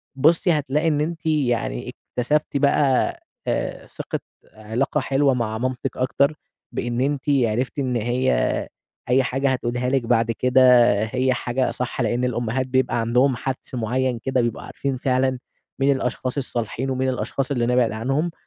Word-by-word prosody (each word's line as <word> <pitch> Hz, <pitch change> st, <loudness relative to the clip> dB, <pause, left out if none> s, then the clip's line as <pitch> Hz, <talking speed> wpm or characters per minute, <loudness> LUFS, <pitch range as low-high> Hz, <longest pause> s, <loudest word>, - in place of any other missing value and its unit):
بُصي 165 Hz, +6 st, +3 dB
هتلاقي 150 Hz, +1 st, 0 dB
إن 150 Hz, -2 st, +2 dB
أنتِ 165 Hz, +1 st, -3 dB
يعني 125 Hz, -, 0 dB, 0.3 s
اكتسبتِ 145 Hz, +3 st, +1 dB
بقى 140 Hz, -1 st, +2 dB, 0.3 s
آآ، -, -, -2 dB
ثقة -, -, -5 dB, 0.3 s
علاقة 110 Hz, +7 st, -1 dB
حلوة 135 Hz, +1 st, +2 dB
مع 115 Hz, -3 st, -2 dB
مامتِك 130 Hz, +1 st, -3 dB
أكتر، 140 Hz, +3 st, +1 dB, 0.4 s
بإن 120 Hz, +1 st, -2 dB
أنتِ 140 Hz, 0 st, 0 dB
عرفتي 130 Hz, +1 st, +1 dB
إن 130 Hz, -2 st, -1 dB
هي 120 Hz, -, 0 dB, 0.4 s
أي 130 Hz, +2 st, +4 dB
حاجة 135 Hz, +2 st, 0 dB
هتقولها 125 Hz, 0 st, -1 dB
لِك 135 Hz, 0 st, +2 dB
بعد 115 Hz, -1 st, +2 dB
كده 125 Hz, +3 st, +2 dB, 0.4 s
هي 130 Hz, +3 st, +1 dB
حاجة 125 Hz, +1 st, -1 dB
صح 125 Hz, +1 st, -3 dB
لأن 120 Hz, +2 st, 0 dB
الأمهات 125 Hz, +1 st, -1 dB
بيبقى 130 Hz, -2 st, +1 dB
عندهم 125 Hz, +4 st, +2 dB
حَدس 130 Hz, +2 st, -5 dB
معين 125 Hz, +1 st, -1 dB
كده 130 Hz, +1 st, 0 dB
بيبقوا 120 Hz, -2 st, -2 dB
عارفين 135 Hz, -2 st, -3 dB
فعلًا 130 Hz, 0 st, +1 dB, 0.4 s
مين 140 Hz, +1 st, +3 dB
الأشخاص 125 Hz, +1 st, -3 dB
الصالحين 125 Hz, 0 st, -3 dB
ومين 130 Hz, 0 st, 0 dB
الأشخاص 130 Hz, +2 st, -2 dB
اللي 120 Hz, -4 st, +1 dB
نبعد 125 Hz, -1 st, +3 dB
عنهم، 135 Hz, +10 st, -1 dB
130 Hz, 150 wpm, -23 LUFS, 120-135 Hz, 0.4 s, أي